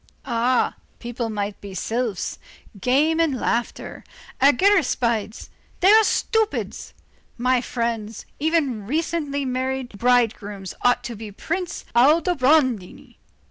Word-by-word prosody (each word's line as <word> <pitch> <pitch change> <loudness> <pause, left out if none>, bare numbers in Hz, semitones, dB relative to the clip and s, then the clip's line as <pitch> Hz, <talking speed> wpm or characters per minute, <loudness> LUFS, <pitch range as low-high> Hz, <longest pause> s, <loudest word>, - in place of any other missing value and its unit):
Ah! 240 +2 +1 0.2
people 235 -1 -4
might 205 -1 -4
be 200 -2 -9
sylphs. 225 -1 -3 0.4
Games 300 - +2
and 290 -6 0
Laughter, 235 0 -3 0.4
argiraspides; 260 - +2 0.3
they 380 +3 +6
are 440 +1 +7
stupids. 440 0 -1 0.4
My 250 +1 +2
friends, 230 -3 -3 0.2
every 320 -1 +2
recently 285 +5 -2
made 260 0 -2
bridegroom 225 -5 +1 0.2
ought 245 0 +2
to 240 - -6
be 215 0 -8
Prince 345 - -4
Aldobrandini. 270 - +2
250 Hz, 100 wpm, -23 LUFS, 230-310 Hz, 0.4 s, are